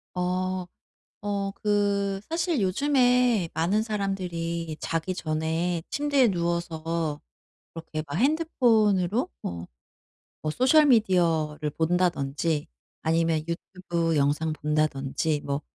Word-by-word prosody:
어. 185 +1 -1 0.6
어 200 -1 -1
그 200 -1 +1
사실 330 -3 0
요즘에 245 - +3
많은 185 +7 +1
사람들이 175 -6 -3
자기 165 +3 -2
전에 160 +1 -1
침대에 285 -4 +2
누워서 170 -3 -2 0.6
그렇게 160 -2 -5
막 145 - -5
핸드폰으로 235 - +2
뭐 85 0 -5 0.8
뭐 155 - -1
소셜 265 - +4
미디어를 165 - +2
본다든지 160 -2 0 0.4
아니면 165 -1 +1
유튜브 170 -1 -2
영상 150 +3 +1
본다든지 150 0 0
뭐 140 +1 -2
175 Hz, 220 characters per minute, -26 LUFS, 160-205 Hz, 0.8 s, 소셜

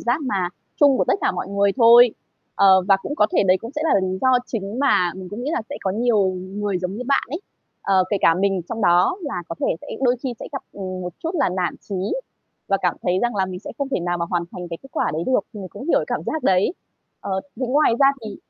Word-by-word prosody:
giác 240 +6 0
mà 195 -9 -1 0.3
chung 285 -3 +6
của - - +3
tất - - +2
cả 400 - +1
mọi - - -4
người 200 0 +2
thôi. 240 0 +8 0.4
Ờ, 190 -1 +5
và 195 - +6
cũng 290 - -4
có 210 - +4
thể - - +5
đấy 185 +1 +5
cũng 230 - -7
sẽ 300 - -3
là 200 -11 +3
lý 185 0 -2
do 260 - +3 0.2
chính 215 +1 -4
mà 180 -11 +3
mình 185 -1 -8
cũng 210 +5 -6
nghĩ 280 - -2
là 315 - -1
sẽ - - -4
có 190 - -1
nhiều 220 -1 +2
người 190 +1 -3
giống 180 +1 -3
như 250 - -5
bạn 275 - +3
ấy, 315 +6 -4 0.4
ờ, 190 -1 +3
kể 205 - +2
cả 165 - +5
mình 195 0 +1
trong 225 - -4
đó 180 - +4
là 280 - -4
có 165 - -4
thể - - +1
sẽ - - -12 0.2
đôi 250 -1 +3
khi 255 -3 -3
sẽ - - -6
gặp, 275 - -4
ừm, 185 -2 -6
một 180 -1 -5
chút 330 - -1
là 285 -6 +2
nản 180 -1 -2
chí, 200 - -4 0.7
và 195 - +3
cảm 180 -2 +1
thấy 180 +1 +1
rằng 240 -2 0
là 190 -1 +1
mình 185 -1 -6
sẽ - - -8
không 280 -1 -2
thể 265 - -1
nào 175 0 -1
mà 170 - 0
hoàn 175 -1 0
thành 180 -1 -7
cái 165 - -5
kết 270 - -13
quả - - 0
đấy 160 - -2
được, 260 -5 +3
mình 200 -4 -7
cũng 260 - -9
hiểu - - +3
cảm - - -2
giác 315 - -2
đấy. 185 - +3 0.5
Ờ, 190 -1 -2 0.2
thế 255 - -2
ngoài 275 +1 +3
ra 275 - +7 0.2
thì 210 -2 -6
200 Hz, 270 wpm, -22 LUFS, 185-250 Hz, 0.7 s, thôi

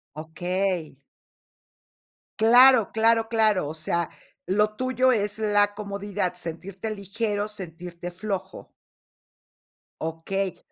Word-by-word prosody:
Okey. 175 0 -2 1.4
Claro, 245 0 +7
claro, 225 0 +3
claro. 215 -8 +2
O 155 - -5
sea, 165 +1 -2 0.4
lo 210 +3 +1
tuyo 255 +1 +2
es 210 -2 -1
la 205 -1 +2
comodidad, 200 -3 -3
sentirte 180 +5 -6
ligero, 205 +1 -2
sentirte 175 -3 -8
flojo. 190 0 -5 1.3
Okey. 175 +4 -3
200 Hz, 90 wpm, -25 LUFS, 180-215 Hz, 1.4 s, Claro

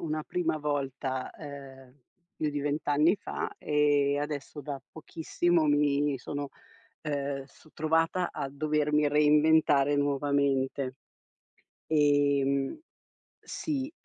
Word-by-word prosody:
una 155 -1 -2
prima 165 -1 -1
volta, 135 -3 -3
ehm, 135 -3 -11 0.4
più 155 - -1
di 145 0 -3
20 145 +2 -2
anni 150 +6 +4
fa, - - -5
e 145 -1 +2
adesso 145 0 -4
da 140 -3 -5
pochissimo 165 +1 0
mi 145 -1 +2
sono, 145 +3 -5 0.5
ehm, 140 -2 -3
s 150 - -21
trovata 165 +3 +1
a 135 - -4
dovermi 150 +1 +1
reinventare 150 -1 +4
nuovamente. 140 -2 0 0.9
Ehm 140 - +2 0.6
sì. 285 -2 -4
145 Hz, 105 wpm, -29 LUFS, 140-155 Hz, 0.9 s, anni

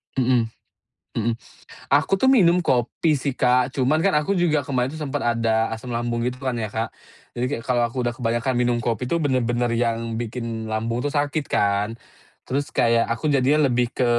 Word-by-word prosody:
Mhm, 125 -3 +2 0.7
mhm. 115 +1 0 0.5
Aku 155 +8 +2
tuh 265 - +3
minum 180 -10 +5
kopi 140 +2 +1
sih, 140 +1 -2
Kak, 125 0 +3
cuman 145 +5 +2
kan 195 - +3
aku 175 +7 -1
juga 170 -4 +2
kemarin 130 -1 0
tuh 160 - -8
sempat 145 -2 -3
ada 115 -1 +1
asam 120 +2 -5
lambung 120 0 -1
gitu 125 +1 -5
kan 130 -2 -1
ya, 110 - -2
Kak. 110 +3 -3 0.5
Jadi 125 - 0
kayak 115 - -7
kalau 125 -1 +1
aku 125 +2 -3
udah 120 - 0
kebanyakan 120 +1 -1
minum 120 -1 +2
kopi 120 +2 -1
itu 170 - 0
bener-bener 120 -4 +1
yang 115 -1 -1
bikin 115 -1 -4
lambung 115 +2 -2
tuh 145 - -2
sakit 145 0 0
kan. 100 +2 +1 0.5
Terus 140 +2 -3
kayak 115 -1 +3
aku 120 +7 -1
jadinya 140 +1 +3
lebih 120 0 0
ke 125 - +1
125 Hz, 185 wpm, -23 LUFS, 115-140 Hz, 0.7 s, minum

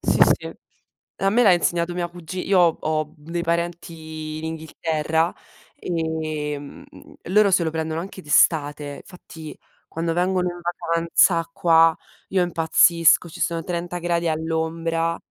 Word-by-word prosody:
sì, - - +1 0.2
sì. - - -8 0.7
A 195 - +1
me 240 +4 +3
l'ha 200 - +7
insegnato 175 0 0
mia 175 -1 -2
cugi 175 +1 -7
io 195 -1 +3
ho 170 -2 +4
ho, 155 0 0 0.2
uhm, 150 +2 -15
dei 170 0 -2
parenti 165 -2 -4
in 155 - -7
Inghilterra, 160 0 -1 0.4
ehm, 155 -3 -4 0.4
loro 205 +2 +4
se 175 - +4
lo 160 - -1
prendono 160 0 -3
anche 190 +2 -8
d'estate, 145 -1 +1
fatti, 165 -5 -11 0.3
quando 165 0 -2
vengono 180 +1 0
in 175 0 -9
vacanza 170 0 +1
qua 165 -1 +4 0.3
io 190 -1 +1
impazzisco, 170 0 +3
ci 160 - -11
sono 165 -1 -1
30 175 0 -4
gradi 170 0 -1
all'ombra, 165 +1 -1
165 Hz, 140 wpm, -22 LUFS, 160-175 Hz, 0.7 s, l'ha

